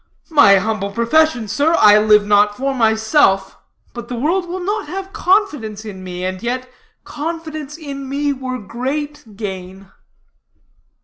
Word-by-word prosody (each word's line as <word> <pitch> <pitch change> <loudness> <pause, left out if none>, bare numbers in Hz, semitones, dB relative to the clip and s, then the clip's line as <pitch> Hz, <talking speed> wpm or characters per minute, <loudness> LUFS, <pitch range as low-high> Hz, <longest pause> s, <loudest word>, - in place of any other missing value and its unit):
"My 200 -10 +7
humble 205 0 -1
profession, 235 +3 +1
sir. 285 +10 +1
I 210 0 +7
live 210 -1 +4
not 205 0 +3
for 275 +1 -1
myself; 220 -2 +2 0.3
but 240 - -8
the 250 - -5
world 345 +8 -1
will 365 +2 -4
not 420 +1 -2
have 385 +1 -6
confidence 300 - 0
in 190 -3 -8
me, 180 0 -5
and 185 0 -4
yet 250 +2 -3 0.4
confidence 310 -1 -6
in 275 -4 -7
me 285 +1 -1
were 260 -1 -5
great 265 +2 -5
gain." 190 -2 -7
250 Hz, 140 wpm, -18 LUFS, 210-300 Hz, 0.4 s, My